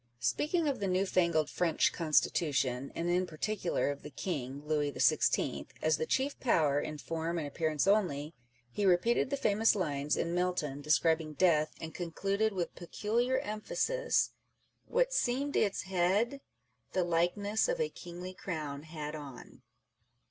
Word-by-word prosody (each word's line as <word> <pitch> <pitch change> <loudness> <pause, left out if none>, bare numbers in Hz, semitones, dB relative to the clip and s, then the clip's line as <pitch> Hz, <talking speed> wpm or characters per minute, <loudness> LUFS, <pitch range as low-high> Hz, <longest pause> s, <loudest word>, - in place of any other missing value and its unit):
Speaking 300 - +1
of 280 - 0
the 200 - -1
newfangled 180 -4 +2
French 170 -1 +1
Constitution, 140 -5 +1
and 170 - -2
in 180 +1 +1
particular 175 -1 -1
of 145 - -7
the - - -8
King 140 -5 -4
(Louis 150 -1 0
XVI.) - - +2
as 155 0 +2
the 160 - -2
chief 275 +2 0
power 150 - +2
in 150 - -5
form 165 +3 -3
and 155 -3 -2
appearance 155 0 0
only, 170 -7 +1 0.4
he 205 - -2
repeated 195 +7 +3
the 280 - -1
famous 220 -3 +3
lines 150 -6 -1
in 170 - -1
Milton 175 -6 -1
describing 155 +2 +2
Death, 155 -2 +2
and 160 0 -7
concluded 195 +5 -1
with 180 -4 -3
peculiar 230 +8 -1
emphasis, 485 - 0 0.6
What - - +1
seemed 275 - 0
its 200 -2 +1
head, 195 +9 +1 0.5
The 185 - +2
likeness 175 +5 +1
of - - 0
a 470 -1 +1
kingly 180 +1 -8
crown 155 -6 -5
had 155 -1 -6
on. 145 -5 -10
175 Hz, 145 wpm, -32 LUFS, 150-205 Hz, 0.6 s, repeated